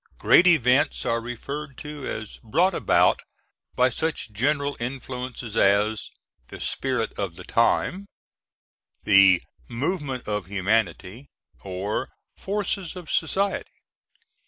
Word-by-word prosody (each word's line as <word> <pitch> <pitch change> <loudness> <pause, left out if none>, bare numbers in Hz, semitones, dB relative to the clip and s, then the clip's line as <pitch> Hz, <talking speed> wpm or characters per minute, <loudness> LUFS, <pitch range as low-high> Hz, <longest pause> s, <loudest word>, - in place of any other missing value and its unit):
Great 180 - +6
events 145 -3 +3
are 115 -1 0
referred 140 +4 -6
to 150 -2 -7
as 110 -1 -6
brought 175 - +2
about - - +3 0.6
by 125 - +4
such 160 -3 -3
general 140 +6 0
influences 125 -2 -5
as 105 +1 +2 0.4
"the - - -10
spirit 130 -4 -1
of 95 -5 -3
the 90 - -10
time" 180 - +1 1.0
(Goethe's 105 - +1 0.3
Zeitgeist), - - -27 0.2
the - - -10
"movement 140 -2 -2
of 105 -3 -2
humanity," 100 - -1 0.3
or 95 +2 -3 0.3
"forces 195 -3 -3
of 180 -3 -8
society." 195 +5 -1
125 Hz, 115 wpm, -25 LUFS, 110-150 Hz, 1.0 s, Great